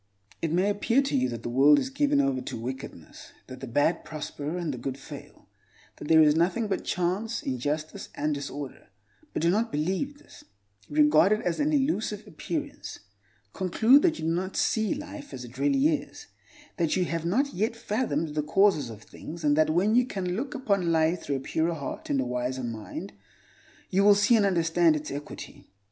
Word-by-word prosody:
It 165 - -1
may 185 +5 +2
appear 230 +6 +2
to 275 - -2
you 130 0 +2
that 115 -1 -6
the - - -3
world 140 +4 +6
is 260 - -1
given 285 +1 +2
over 275 -1 +1
to 250 - -6
wickedness; 125 - -8
that 130 0 -10
the 135 - -7
bad 145 +8 +1
prosper, 155 +1 -5
and 170 -5 -2
the 125 - -6
good 130 +2 -4
fail; - - -12 0.5
that - - -8
there 160 0 +7
is 150 -1 +5
nothing 185 +8 +1
but 195 - -2
chance, 190 +6 -1
injustice, 145 +4 -3
and 150 +1 -1
disorder. 140 -1 -6 0.4
But - - -3
do 170 - +4
not 225 +4 0
believe 190 - -2
this: - - -17 0.5
regard 150 +5 +5
it 215 - -1
as 175 -2 -2
an 295 +1 +1
elusive 265 -8 0
appearance. 295 -3 -6 0.5
Conclude 220 +9 +4
that 325 -1 +2
you - - -5
do 165 - +1
not 185 +3 -2
see 220 -2 +1
life 290 -1 -8
as 125 - -7
it 120 +2 -12
really 140 +1 +3
is; 155 - -3 0.5
that 165 -2 +1
you 185 - +1
have 165 -1 -3
not 255 - +1
yet 215 +5 -1
fathomed 210 - -1
the 150 - 0
causes 155 - +2
of 105 -2 -10
things, 165 +8 -10
and 145 -1 +3
that 155 0 +3
when 180 +7 +2
you 245 +1 +4
can 180 -5 -3
look 270 +7 -4
upon 200 -10 0
life 160 +2 +2
through 140 - -2
a - - -2
purer 165 +4 -1
heart 140 -4 -6
and 140 - +1
a 130 - 0
wiser 125 +1 -2
mind, 110 -5 -6 0.8
you 195 +2 +3
will 205 0 +7
see 205 +4 +4
and 205 -3 +4
understand 170 -2 +3
its 150 0 -5
equity. 145 +2 -8
170 Hz, 195 wpm, -27 LUFS, 145-215 Hz, 0.8 s, there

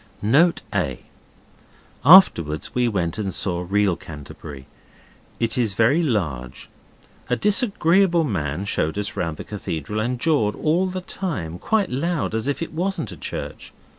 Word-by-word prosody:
Note 155 +11 +3
A. 75 -10 -1 1.0
Afterwards 100 - +6
we 125 -1 +2
went 90 -4 -1
and 100 -3 -2
saw 90 0 -1
real 100 -2 +2
Canterbury. 75 -4 -10 0.7
It 115 +1 0
is 110 -5 0
very 125 +10 +3
large. 75 - -3 0.6
A 125 - +2
disagreeable 195 - +2
man 90 - -2
showed 80 -3 -1
us 105 0 -3
round 80 -2 -2
the - - -6
cathedral, 105 -1 -4
and 120 +3 -1
jawed 125 -9 +1
all 170 +5 +1
the 185 0 -4
time 105 - -5
quite 215 - 0
loud 155 0 -1
as 110 +3 -2
if 145 +3 -1
it 165 - -8
wasn't 180 0 -2
a - - -8
church. - - -6
110 Hz, 145 wpm, -22 LUFS, -, 1.0 s, Afterwards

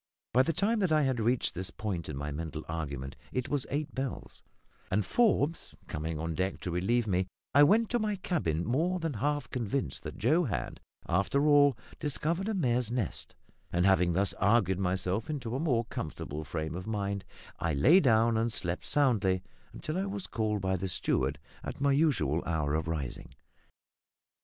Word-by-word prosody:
By 125 - +6
the 135 - +2
time 215 +6 +1
that 185 -5 +1
I 155 -1 +4
had 130 -3 +1
reached 120 -1 +1
this 90 +2 -3
point 95 -7 -4
in 70 - -4
my 75 +1 -3
mental 80 +1 -5
argument 70 -5 -4 0.2
it 130 -1 -2
was 145 -3 -1
eight 145 +1 -2
bells, 135 -1 -5 0.5
and, 100 +1 +1
Forbes 170 - +1
coming 80 +1 -4
on 80 +1 -2
deck 95 +4 -1
to 90 - -3
relieve 105 +7 +1
me, 95 -2 +1 0.3
I 140 - +7
went 215 +10 +5
to 240 - +2
my 215 -2 0
cabin 90 - -1
more 165 +10 +1
than 165 -3 -2
half 145 +6 -1
convinced 125 +1 -2
that - - -7
Joe 155 - +3
had, 120 - -3 0.3
after 100 - +2
all, 145 -2 +5 0.2
discovered 165 +5 -1
a 220 - 0
mare's 125 - +1
nest; 120 -7 -2 0.4
and 90 +1 +2
having 90 -3 +4
thus 95 +3 +1
argued 100 -3 +3
myself 95 +4 0
into 130 -6 -3
a - - -1
more 125 -7 +1
comfortable 75 -5 -5
frame 80 +1 -4
of 90 +4 -6
mind, 100 -2 -2 0.4
I 80 -2 0
lay 155 - +6
down 115 -5 +4
and 115 +1 +1
slept 90 -4 -3
soundly 105 -10 +2 0.3
until 170 +2 -4
I 195 - 0
was 195 -1 -3
called 105 -2 -1
by 95 0 0
the 95 +2 -3
steward 90 - 0 0.3
at - - -6
my 140 0 +3
usual 120 - +2
hour 75 -3 0
of 80 +1 0
rising. 75 -7 -4
110 Hz, 180 wpm, -30 LUFS, 90-145 Hz, 0.5 s, I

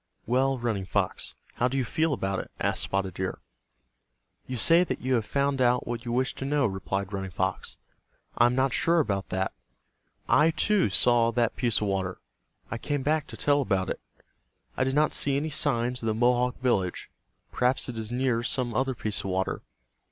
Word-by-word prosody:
"Well, 130 +3 +1
Running 110 -6 -2
Fox, - - -1 0.2
how 125 - +2
do 130 +2 -2
you 130 - 0
feel 160 +7 0
about 95 -7 -1
it?" - - -7
asked - - 0
Spotted 95 -1 -1
Deer. 95 +1 -3 1.1
"You 130 - -4
say 165 +9 +7
that - - -3
you 130 +1 -1
have 115 -4 0
found 140 -1 0
out 125 0 +3
what 120 0 -5
you 120 - -3
wished 125 +2 0
to 135 - -3
know," 145 0 +1
replied 95 -1 -3
Running 95 -1 -3
Fox. 95 +1 -3 0.6
"I 120 - +5
am 120 - 0
not 130 -1 +1
sure 170 +1 +3
about 100 -9 -1
that. 95 +1 -1 0.7
I, 155 +2 +5
too, 185 - +2
saw 115 +3 +4
that 120 -1 +1
piece 120 -4 +1
of 105 - 0
water. 95 -2 -2 0.5
I 115 - -3
came 145 0 -2
back 155 +1 0
to - - -10
tell 145 0 +2
about 95 -7 0
it. - - -4 0.8
I - - +1
did 130 +1 -1
not 150 +1 +3
see 140 -1 +1
any 155 +2 -2
signs 125 -4 +1
of 115 - -3
the 110 - +1
Mohawk 125 +2 +2
village. 100 -8 -1 0.4
Perhaps 125 +1 +1
it 125 - -5
is 110 0 -5
near 125 -2 +1
some 120 0 -1
other 130 +2 0
piece 105 -2 -3
of - - -6
water. 95 +1 -1
120 Hz, 195 wpm, -27 LUFS, 105-135 Hz, 1.1 s, say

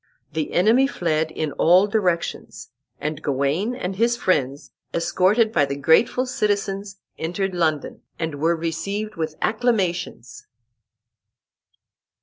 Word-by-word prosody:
The 155 -2 -3
enemy 225 +9 +4
fled 160 - -1
in 155 -1 -3
all 180 +4 +6
directions, 195 -5 -2 0.3
and 155 0 -4
Gawain 145 - 0
and 190 -6 -4
his 235 +2 +2
friends, 140 - -1 0.2
escorted 200 +6 +2
by 145 -10 +3
the 140 0 -4
grateful 160 - +3
citizens, 205 -5 -2 0.2
entered 185 +4 -2
London, 160 -4 -1 0.2
and 160 -3 -4
were 165 +2 +3
received 200 +6 -3
with 160 -3 -3
acclamations. 190 - -1
180 Hz, 115 wpm, -22 LUFS, 160-210 Hz, 0.3 s, all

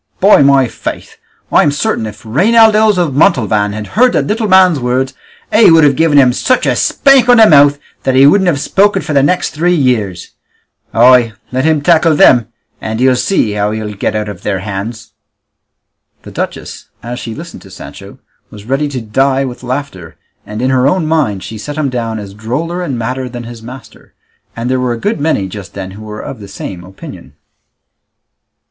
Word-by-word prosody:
By 195 -5 +5
my 135 -2 +4
faith, - - -7 0.3
I'm 150 - +4
certain 145 - -2
if 110 - -12
Reinaldos 215 - +3
of 170 -6 0
Montalvan 110 - +1
had 105 0 -6
heard 250 +2 +3
the - - +1
little 215 +1 -2
man's 185 -5 +4
words 130 +2 -1 0.4
he 220 +2 +6
would 165 -1 +5
have 145 -2 +3
given 160 -1 +2
him 130 -3 +5
such 255 - 0
a - - +1
spank 270 -3 +3
on 245 - +6
the 225 - +7
mouth 145 -4 +5 0.2
that 130 - -1
he 135 +1 +6
wouldn't 190 +6 +4
have 155 -5 +1
spoken 195 +5 +1
for 150 - -4
the 140 - +3
next 180 +6 0
three 175 +4 0
years; 110 - -1 0.6
ay, 120 -1 +4 0.2
let 130 +2 -1
him 160 -2 +1
tackle 165 -1 +3
them, 120 -5 +4 0.3
and 110 +1 -4
he'll 130 0 +3
see 125 - 0
how 105 0 -1
he'll 105 -1 -5
get 100 - -3
out 105 0 -2
of 100 -4 -8
their 100 -2 -2
hands!" 110 +3 -6 1.1
The - - -11
duchess, - - -6
as 120 +2 -6
she 115 -3 -7
listened 170 +2 -10
to - - -15
Sancho, - - -12 0.3
was 105 -1 -13
ready 135 +4 -1
to 135 -3 -5
die 135 +5 0
with 125 -1 -8
laughter, 125 - -6 0.3
and 105 +3 -5
in 130 - +1
her 130 0 +2
own 165 +3 0
mind 145 -12 -1
she 110 -1 -8
set 145 +7 -7
him 150 -3 -1
down 115 -3 -3
as 100 -2 -9
droller 140 - -4
and 140 -8 -4
madder 125 +2 -4
than 120 -1 -8
his 120 -1 -10
master; 120 -1 -13 0.4
and 115 +1 -4
there 130 0 0
were 125 -1 -1
a - - -5
good 205 - -2
many 145 -10 -1
just 95 0 -10
then 95 -1 -7
who 100 +3 -12
were 105 0 -8
of - - -8
the 100 - -10
same 95 -2 -8
opinion. 95 +2 -12
130 Hz, 195 wpm, -12 LUFS, 110-160 Hz, 1.1 s, the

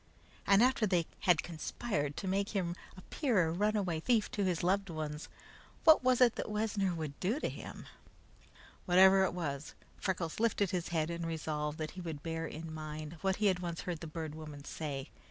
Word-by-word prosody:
And 200 +3 +6
after 250 -4 +3
they 175 -4 +2 0.2
had 170 -3 +5
conspired 155 -2 -3
to 195 - -4
make 200 +2 0
him 175 -3 0 0.2
appear 210 - +1
a - - -1
runaway 195 -2 +1
thief 225 +4 +2
to 205 - -1
his 180 -3 0
loved 195 +2 +2
ones, 155 -2 -5 0.5
what 315 -4 +7
was 255 0 +3
it 240 -2 +5
that - - -3
Wessner 210 -3 0
would 155 -3 -5
do 215 +10 0
to - - -1
him? - - -8 1.0
Whatever 190 +2 +7
it 180 - -2
was, 145 -4 -4 0.2
Freckles 180 -3 -2
lifted 210 -4 +2
his 175 -2 -1
head 165 -1 0
and 170 0 -3
resolved 155 -2 -2
that 155 -1 -4
he 185 - -8
would 160 -4 -6
bear 165 0 -3
in 160 +1 -7
mind 155 +1 -6
what 190 -1 +1
he 210 - -1
had 190 -3 +3
once 170 -2 -4
heard 175 -4 -4
the 165 - -6
Bird 155 -1 -5
Woman 150 -2 -9
say. 145 -3 -5
175 Hz, 190 wpm, -33 LUFS, 155-200 Hz, 1.0 s, what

